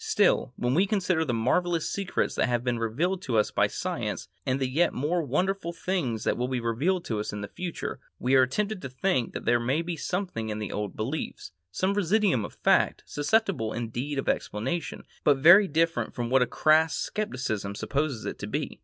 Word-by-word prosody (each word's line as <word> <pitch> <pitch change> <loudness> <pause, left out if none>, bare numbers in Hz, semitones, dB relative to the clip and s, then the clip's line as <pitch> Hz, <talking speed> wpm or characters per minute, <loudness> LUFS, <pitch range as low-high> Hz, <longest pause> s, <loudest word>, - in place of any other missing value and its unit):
Still, - - +2
when 120 +1 0
we 185 +7 +3
consider 185 -5 +1
the 140 - -1
marvellous 165 +9 +1
secrets 195 -2 -1
that - - +1
have 120 -1 0
been 120 -2 0
revealed 160 +12 -1
to 120 -9 -1
us 105 - +2
by - - +3
science - - -4 0.2
and 130 +1 +1
the 135 - 0
yet 160 +7 +1
more 160 +7 0
wonderful 175 +5 -1
things 145 - -2
that - - +1
will 125 +1 -1
be 130 -1 -1
revealed 145 +11 0
to 110 -3 -2
us 105 - -3
in 105 - -5
the 100 - -4
future, 175 - -5 0.2
we 125 +2 0
are 130 -1 +6
tempted 210 +7 -2
to 135 - -5
think 130 -1 0
that - - -6
there 120 0 +3
may 135 +8 0
be 170 0 -3
something 165 - -3
in 105 - -3
the 105 -2 -4
old 105 -1 -4
beliefs, 125 -3 -4 0.2
some 185 - 0
residuum 200 - +2
of - - -8
fact, - - +2
susceptible 155 - 0
indeed 120 +5 -3
of 135 - -2
explanation, 130 +11 -2 0.2
but 145 -2 +4
very 175 +8 +8
different 160 -7 0
from 120 0 -3
what 130 0 +5
a 125 - +3
crass 155 +1 +3 0.2
scepticism 130 - -2
supposes 140 0 -2
it - - -5
to - - -5
be. - - -3
140 Hz, 205 wpm, -27 LUFS, 120-175 Hz, 0.2 s, very